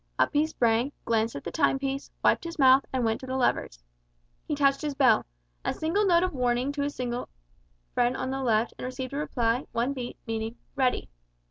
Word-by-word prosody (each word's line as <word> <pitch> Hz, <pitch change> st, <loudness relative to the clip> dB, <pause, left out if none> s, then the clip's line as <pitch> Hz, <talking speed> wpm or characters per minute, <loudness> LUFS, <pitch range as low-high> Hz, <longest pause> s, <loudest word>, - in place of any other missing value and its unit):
Up -, -, +3 dB
he 300 Hz, +2 st, +3 dB
sprang, 240 Hz, -2 st, +1 dB
glanced 225 Hz, 0 st, +1 dB
at 140 Hz, -, -6 dB
the 170 Hz, -, -5 dB
time 270 Hz, -, +2 dB
piece, 275 Hz, 0 st, -3 dB
wiped -, -, +3 dB
his 335 Hz, 0 st, -6 dB
mouth, 265 Hz, -1 st, +6 dB
and 255 Hz, -2 st, 0 dB
went 225 Hz, 0 st, 0 dB
to 260 Hz, -, -9 dB
the 260 Hz, -, -3 dB
levers. -, -, 0 dB, 0.6 s
He 300 Hz, -, -1 dB
touched 275 Hz, -1 st, +3 dB
his 295 Hz, -2 st, -3 dB
bell 255 Hz, -5 st, +4 dB, 0.4 s
a -, -, -1 dB
single 390 Hz, +6 st, +1 dB
note 345 Hz, -1 st, +5 dB
of 370 Hz, -, -1 dB
warning 250 Hz, +1 st, +1 dB
to 285 Hz, 0 st, -3 dB
his 285 Hz, 0 st, -2 dB
signal 245 Hz, -1 st, -3 dB, 0.6 s
friend 245 Hz, +1 st, +2 dB
on 260 Hz, 0 st, -2 dB
the 270 Hz, 0 st, -2 dB
left 230 Hz, -2 st, +1 dB
and -, -, -4 dB
received 255 Hz, +1 st, -5 dB
a -, -, -2 dB
reply, 245 Hz, -4 st, 0 dB
one 240 Hz, +4 st, 0 dB
beat, 250 Hz, -3 st, -6 dB
meaning 225 Hz, 0 st, -3 dB, 0.2 s
"Ready." 260 Hz, -2 st, +1 dB
255 Hz, 210 wpm, -27 LUFS, 240-280 Hz, 0.6 s, mouth